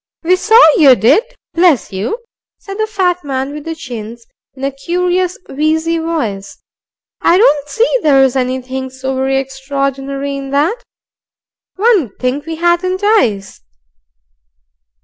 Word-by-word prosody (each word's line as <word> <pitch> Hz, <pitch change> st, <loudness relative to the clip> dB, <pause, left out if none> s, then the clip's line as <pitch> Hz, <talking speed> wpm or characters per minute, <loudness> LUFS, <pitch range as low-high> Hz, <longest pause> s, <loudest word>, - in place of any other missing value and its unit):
"We 360 Hz, +3 st, +3 dB
saw 440 Hz, +5 st, +4 dB, 0.2 s
you 275 Hz, -5 st, +7 dB
did, 245 Hz, -, +3 dB, 0.3 s
bless 335 Hz, -, +2 dB
you," 225 Hz, -, -3 dB, 0.4 s
said 395 Hz, +1 st, -9 dB
the 435 Hz, -, 0 dB
fat 365 Hz, -4 st, -1 dB
man 270 Hz, 0 st, -3 dB
with 300 Hz, -1 st, -8 dB
the 325 Hz, 0 st, -4 dB
chins, 235 Hz, -5 st, -8 dB, 0.3 s
in 265 Hz, -, -10 dB
a 275 Hz, -, 0 dB
curious 360 Hz, +5 st, -1 dB
wheezy 320 Hz, +3 st, 0 dB
voice. 230 Hz, -13 st, -4 dB, 0.6 s
"I 345 Hz, -, +4 dB
don't 295 Hz, -, +3 dB
see 460 Hz, +8 st, +1 dB
there's 270 Hz, -5 st, +3 dB
anything 260 Hz, 0 st, -3 dB
so 260 Hz, +1 st, -5 dB
very 265 Hz, +1 st, 0 dB
extraordinary 275 Hz, +1 st, -3 dB
in 275 Hz, -1 st, -6 dB
that. 310 Hz, -, 0 dB, 0.9 s
One 415 Hz, -, +3 dB
'ud 215 Hz, -, -16 dB
think 265 Hz, +4 st, -2 dB
we 325 Hz, -, -4 dB
hadn't 345 Hz, +3 st, 0 dB
eyes." 225 Hz, -, +1 dB
285 Hz, 135 wpm, -14 LUFS, 265-355 Hz, 0.9 s, you